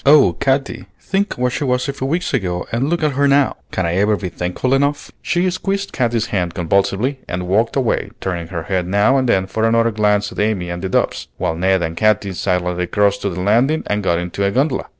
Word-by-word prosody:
"Oh, 140 - +6
Katy, 135 - -1
think 195 +1 -1
what 125 0 0
she - - -2
was 125 -2 0
a 140 - -2
few 135 -1 -4
weeks 170 +4 -1
ago 90 -8 -1
and 120 +5 0
look 170 -1 0
at 150 - +2
her 140 +1 +2
now! 140 0 +3
Can 95 +4 -2
I 85 +1 0
ever 105 +2 +3
be 95 - -4
thankful 90 +10 -2
enough?" 140 +2 0
She 175 +2 0
squeezed 195 +2 -2
Katy's 120 -4 0
hand 90 -3 -1
convulsively 100 - 0
and 90 0 -4
walked 110 +5 +1
away, 130 -4 0
turning 85 -3 -3
her 85 -2 -5
head 90 -1 -1
now 105 +8 +3
and 130 -2 0
then 95 -4 +2
for 110 +3 -3
another 115 +1 +3
glance 105 -1 +1
at - - -8
Amy 100 -5 0
and 85 0 -5
the 95 - -3
doves; - - 0
while - - -1
Ned 95 +1 +1
and 80 0 -3
Katy 105 -1 +1
silently 90 -1 -1
crossed 100 +1 +1
to 100 - -1
the 90 0 -4
landing 120 +11 +2
and 105 0 -1
got 85 -3 +1
into 90 +3 -3
a 100 - +2
gondola. 130 +5 0
105 Hz, 230 wpm, -18 LUFS, 90-135 Hz, -, Oh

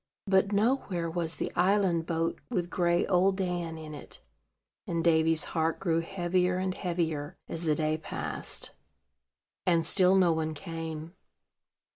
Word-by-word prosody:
But 195 0 +3
nowhere 205 -5 +1
was 165 -1 -2
the - - -3
island 180 -3 +2
boat 165 0 -1
with 180 -7 -2
gray 175 -1 +2
Old 190 +1 +3
Dan 175 -3 -2
in 155 -1 -8
it; 145 - -11 0.7
and 170 -1 -1
Davy's 160 -1 +4
heart 160 -1 -1
grew 165 -4 +1
heavier 180 0 0
and 185 0 -1
heavier, 165 -5 -2
as 165 +1 -1
the 155 -2 +2
day 155 0 0
passed, - - -2 0.9
and 170 -2 +2
still 185 +2 +4
no 185 -3 +5
one 160 -1 -2
came. 165 0 -6
170 Hz, 140 wpm, -29 LUFS, 160-185 Hz, 0.9 s, no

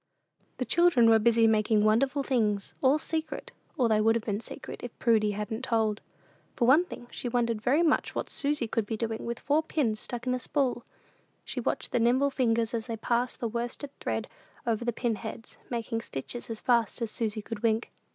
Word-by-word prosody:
The - - -2
children 320 -10 +5
were 225 - +6
busy 230 +1 +4
making 215 -1 +3
wonderful 265 +6 +2
things 210 -7 0
"all 270 +3 +5
secret;" 315 -1 -4 0.3
or 250 - +3
they 215 -1 +3
would 225 +1 +4
have 230 - -1
been 205 -2 -1
secret - - -8
if 245 - -8
Prudy 215 -3 +3
hadn't 210 +4 -4
told. 220 -4 +1 0.5
For 235 - +2
one 305 +8 +6
thing, 240 - -9
she 245 - -4
wondered 235 -2 0
very 280 +9 +3
much 315 - +1
what - - -2
Susy 290 -3 0
could 220 -1 -1
be 220 - -2
doing 225 0 -3
with 235 0 -2
four 290 +3 +2
pins 260 -9 -1
stuck 240 +2 -5
in 250 - +1
a 255 - -1
spool. 255 -3 -1 0.6
She - - -4
watched - - -2
the 245 - +2
nimble 255 +5 +3
fingers 230 -3 +1
as 225 0 -2
they 230 -2 -3
passed 240 +3 -1
the 235 - 0
worsted 240 +5 -4
thread - - -2 0.4
over 230 -1 0
the 240 - 0
pin 230 -1 -1
heads, 225 +1 -8
making 230 -1 -2
stitches 230 - -6
as 225 -1 -5
fast 235 -3 +2
as 225 - -3
Susy 215 -2 -2
could 220 -1 -6
wink. 225 0 +1
235 Hz, 200 wpm, -29 LUFS, 220-255 Hz, 0.6 s, were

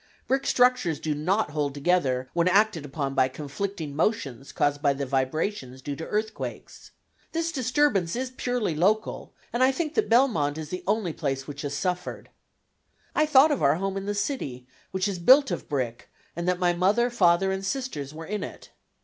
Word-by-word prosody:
"Brick 270 +1 0
structures 250 -10 +3
do 155 - -1
not 175 +4 0
hold 145 -2 -2
together 140 -5 +1
when 170 +1 +2
acted 200 -4 +3
upon 140 -1 -3
by 130 - +3
conflicting 150 +3 -5
motions 140 - -1
caused 145 0 0
by 140 -2 +3
the 140 0 -3
vibrations 130 +1 -2
due 140 +2 -5
to 160 - -7
earthquakes. 220 +1 -4 0.4
This 330 0 -1
disturbance 250 - +1
is 255 +1 -3
purely 245 -7 -1
local, 205 +8 0 0.2
and 240 - 0
I 260 +1 +6
think 305 +2 -3
that 435 - +1
Belmont 220 - +3
is 155 -2 -6
the 180 - -5
only 205 -5 0
place 135 -4 -2
which 140 -1 -7
has 145 -1 -3
suffered." 180 +1 -3 0.8
I 305 - +2
thought 300 +1 +6
of 285 - 0
our 140 +1 +4
home 195 +2 -2
in 195 0 -4
the 205 - -1
city, 200 - -3 0.2
which 190 +1 -1
is 195 -3 -3
built 265 +10 +6
of - - -4
brick, 125 -5 -3 0.3
and 170 +1 -3
that 180 0 +2
my 180 -1 +2
mother, 205 +8 +2
father, 190 -3 +3
and 190 0 -3
sisters 195 - -3
were 160 +1 -8
in 210 +4 -3
it. - - -9
180 Hz, 185 wpm, -26 LUFS, 145-225 Hz, 0.8 s, I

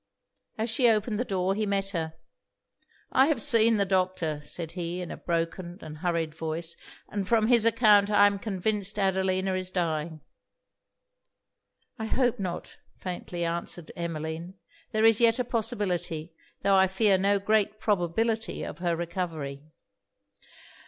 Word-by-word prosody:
As 220 +1 -1
she 240 +2 +4
opened 215 0 +1
the - - +2
door, 190 -4 0
he 215 +1 -1
met 195 -1 0
her. 160 -4 -3 1.0
'I 265 +2 +5
have 305 -6 +1
seen 225 0 +4
the 200 - +2
doctor,' 185 -5 0
said 165 +2 -4
he, 175 0 -4
in 180 - -5
a - - -5
broken 170 +1 -3
and 155 0 -9
hurried 165 -2 -1
voice 165 +1 -4 0.3
'and 200 -2 -3
from 225 -1 +3
his 235 -2 +5
account 210 -3 +5
I 205 -1 +6
am 200 -1 +2
convinced 205 0 -1
Adelina 190 -1 +1
is 185 0 -2
dying.' 160 -3 -2 1.8
'I 220 - -2
hope 245 -1 +1
not,' 185 -3 -5 0.2
faintly 175 -1 -4
answered 170 0 -3
Emmeline. 165 +1 -5 0.4
'There 220 0 +2
is 225 0 +6
yet 230 0 +5
a 250 - +1
possibility, 200 -9 -2 0.3
tho' 200 - +3
I 190 0 +5
fear 190 0 +3
no 200 +1 +3
great 215 +1 +1
probability 220 +3 0
of 165 - -7
her 175 -1 0
recovery.' 165 -5 -4
190 Hz, 145 wpm, -27 LUFS, 170-215 Hz, 1.8 s, I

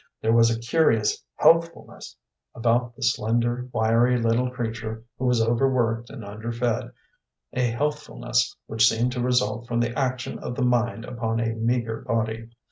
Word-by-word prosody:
There 110 +1 +1
was 115 0 +5
a 115 0 -1
curious 115 -4 +1
healthfulness 165 - +1 0.4
about 120 0 +1
the 130 - -8
slender, 120 +3 0
wiry 115 +3 +3
little 115 +2 +1
creature 115 -2 -5 0.2
who 130 - -2
was 125 -2 +3
overworked 120 -1 +1
and 110 - -9
under 110 +3 -6
fed, 120 +1 -1 0.6
a 125 -1 +1
healthfulness 140 - -1
which 110 +1 +4
seemed 120 +3 0
to 125 -1 -3
result 125 -1 0
from 120 -1 -1
the 120 0 -1
action 130 -2 -2
of 120 - -5
the 130 - 0
mind 120 -2 0
upon 115 -2 -2
a 115 -1 0
meagre 115 0 -1
body. 115 0 -2
120 Hz, 155 wpm, -24 LUFS, 115-125 Hz, 0.6 s, was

